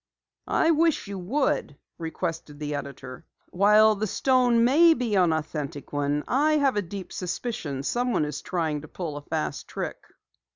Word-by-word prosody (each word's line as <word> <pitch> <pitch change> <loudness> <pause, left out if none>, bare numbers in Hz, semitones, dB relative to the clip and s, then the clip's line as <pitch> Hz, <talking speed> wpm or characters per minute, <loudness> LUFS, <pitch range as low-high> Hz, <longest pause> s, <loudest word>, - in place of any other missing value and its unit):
"I 325 - +3
wish 330 0 +2
you 200 -1 -5
would," 190 - -1 0.2
requested 165 -2 -4
the 150 0 -4
editor. 135 -2 -7 0.3
"While 210 +3 +5
the 215 +1 -2
stone 245 +1 +3
may 320 +7 +6
be 240 -6 -2
an 180 -4 +4
authentic 150 -3 -4
one, 145 +1 0
I 295 +4 +2
have 280 -5 +2
a 205 - +1
deep 190 +1 -8
suspicion 175 - -4
someone 240 - 0
is 150 -1 -5
trying 160 -5 -2
to 155 - -11
pull 160 -2 -5
a 145 - -6
fast 75 - -3
trick." - - -5
180 Hz, 160 wpm, -26 LUFS, 150-245 Hz, 0.3 s, may